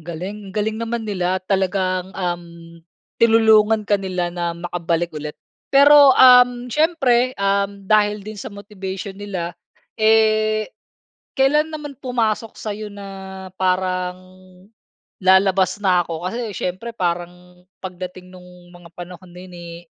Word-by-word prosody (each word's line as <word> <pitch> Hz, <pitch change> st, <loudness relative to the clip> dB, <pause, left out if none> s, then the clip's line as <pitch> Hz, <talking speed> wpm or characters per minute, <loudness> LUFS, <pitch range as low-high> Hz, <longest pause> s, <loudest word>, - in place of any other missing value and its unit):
galing! 185 Hz, +5 st, -7 dB
Ang 190 Hz, -, -13 dB
galing 215 Hz, +1 st, -1 dB
naman 230 Hz, 0 st, -3 dB
nila. 185 Hz, -3 st, -1 dB
Talagang, 185 Hz, -1 st, -1 dB
um, 175 Hz, -2 st, -3 dB, 0.8 s
tinulungan 220 Hz, -1 st, +4 dB
ka 200 Hz, -1 st, +1 dB
nila 180 Hz, -2 st, -3 dB
na 170 Hz, -1 st, -3 dB
makabalik 170 Hz, -1 st, -2 dB
ulit. 150 Hz, 0 st, -7 dB, 0.3 s
Pero, 285 Hz, +1 st, +7 dB
um, 250 Hz, -1 st, +6 dB
siyempre, 260 Hz, -6 st, +2 dB
um, 200 Hz, 0 st, -1 dB
dahil 210 Hz, 0 st, +2 dB
din 215 Hz, -2 st, -8 dB
sa -, -, -6 dB
motivation 200 Hz, -1 st, -7 dB
nila, 190 Hz, -4 st, -5 dB, 0.5 s
eh, 215 Hz, 0 st, +2 dB, 0.6 s
kailan 300 Hz, +4 st, +3 dB
naman 300 Hz, -2 st, -7 dB
pumasok 225 Hz, -3 st, -2 dB
sa'yo 210 Hz, 0 st, -6 dB
na 200 Hz, -1 st, -10 dB, 0.5 s
parang 185 Hz, -1 st, 0 dB, 1.0 s
lalabas 190 Hz, 0 st, +3 dB
na 185 Hz, -3 st, +3 dB
ako? 165 Hz, +1 st, -6 dB
Kasi 230 Hz, -1 st, -5 dB
siyempre 190 Hz, +6 st, -4 dB
parang 180 Hz, 0 st, -4 dB, 0.2 s
pagdating 185 Hz, 0 st, -8 dB
no'ng 180 Hz, -1 st, -16 dB
mga 175 Hz, -1 st, -15 dB
panahon 180 Hz, 0 st, -10 dB
na 180 Hz, -, -12 dB
'yon, 180 Hz, -1 st, -13 dB
eh, 170 Hz, -1 st, -9 dB
195 Hz, 125 wpm, -20 LUFS, 180-220 Hz, 1.0 s, Pero